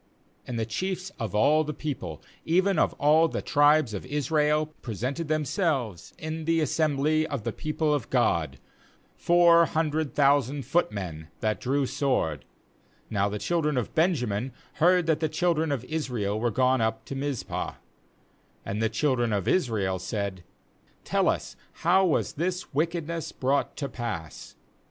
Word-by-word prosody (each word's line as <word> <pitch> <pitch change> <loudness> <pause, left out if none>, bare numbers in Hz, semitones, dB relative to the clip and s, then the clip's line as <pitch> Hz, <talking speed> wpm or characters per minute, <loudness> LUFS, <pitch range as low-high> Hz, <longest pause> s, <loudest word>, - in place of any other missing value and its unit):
2And 120 - -4
the 110 - 0
chiefs 185 - -3
of 110 -3 -3
all 150 +9 +4
the 150 0 -5
people, 95 - -5 0.2
even 185 +2 +2
of - - +2
all 155 +3 +4
the - - -4
tribes 145 -4 +4
of 100 - -4
Israel, 150 +2 +1
pre 115 -4 -5
sented 140 - -3
themselves 150 - -1
in 155 0 -5
the 165 0 +2
assembly 155 0 +1
of 140 -8 -4
the - - -2
people 155 0 -1
of 145 -5 -2
God, 85 - +1 0.6
four 170 -1 +5
hundred 155 -2 -1
thousand 140 -1 +2
footmen 100 - -1
that 110 -1 -1
drew 135 +2 +1
sword. 125 - -1 0.3
— - - -34
3Now 100 -1 +1
the 105 - -3
children 150 - 0
of 125 - -2
Benjamin 130 - 0 0.3
heard 180 +1 +5
that 160 -2 +2
the 160 -1 0
children 160 -1 +1
of 130 -3 -2
Israel 125 -9 -2
were 120 +1 +1
gone 130 +2 +2
up 110 0 -1
to - - -6
Mizpah 135 -2 -3 0.5
— - - -37
And 105 +2 -3
the 110 - +2
children 120 0 +1
of 100 -3 -1
Israel 105 - +1
said: 100 -1 -4 0.6
'Tejl - - +2
us, - - -2 0.3
how 190 +2 +5
was 160 - 0
this 180 +2 -3
wickedness 165 +1 -2
brought 135 +2 -1
to 140 - -2
pass?' 110 - -6
145 Hz, 155 wpm, -27 LUFS, 110-160 Hz, 0.6 s, four